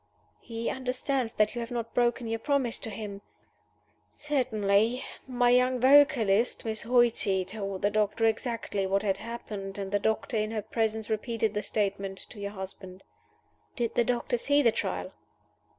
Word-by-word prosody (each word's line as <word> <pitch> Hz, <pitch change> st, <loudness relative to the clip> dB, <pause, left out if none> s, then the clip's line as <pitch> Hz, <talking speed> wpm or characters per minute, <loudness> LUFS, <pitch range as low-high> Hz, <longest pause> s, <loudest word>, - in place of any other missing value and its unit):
"He 230 Hz, 0 st, -5 dB
understands 255 Hz, -1 st, -1 dB
that 215 Hz, 0 st, +2 dB
you 240 Hz, -, -3 dB
have 230 Hz, -, -5 dB
not 235 Hz, -2 st, -4 dB
broken 240 Hz, 0 st, +1 dB
your 225 Hz, 0 st, -2 dB
promise 270 Hz, -2 st, 0 dB
to -, -, -6 dB
him?" 205 Hz, -1 st, -6 dB, 0.9 s
"Certainly. 235 Hz, -5 st, +1 dB, 0.2 s
My 245 Hz, -1 st, +3 dB
young 250 Hz, +1 st, +3 dB
vocalist 250 Hz, -6 st, +4 dB
(Miss 220 Hz, -1 st, -2 dB
Hoighty) 235 Hz, -6 st, +2 dB
told 195 Hz, -1 st, -5 dB
the 205 Hz, -, +3 dB
doctor 215 Hz, +1 st, +1 dB
exactly 225 Hz, -3 st, -1 dB
what 195 Hz, +1 st, +1 dB
had 195 Hz, -2 st, +1 dB
happened; 205 Hz, -4 st, -6 dB
and 195 Hz, -1 st, -4 dB
the 205 Hz, -, +2 dB
doctor 220 Hz, +2 st, 0 dB
in 215 Hz, 0 st, 0 dB
her 220 Hz, -2 st, -3 dB
presence 220 Hz, -1 st, -1 dB
repeated 220 Hz, -1 st, -1 dB
the 210 Hz, -, -1 dB
statement 195 Hz, -2 st, -2 dB
to -, -, -11 dB
your 200 Hz, 0 st, -3 dB
husband." 190 Hz, -1 st, -8 dB, 0.7 s
"Did 235 Hz, -2 st, -1 dB
the 240 Hz, -, +3 dB
doctor 245 Hz, 0 st, 0 dB
see 285 Hz, +3 st, +3 dB
the 230 Hz, -, +5 dB
Trial?" -, -, -3 dB
225 Hz, 160 wpm, -28 LUFS, 205-245 Hz, 0.9 s, the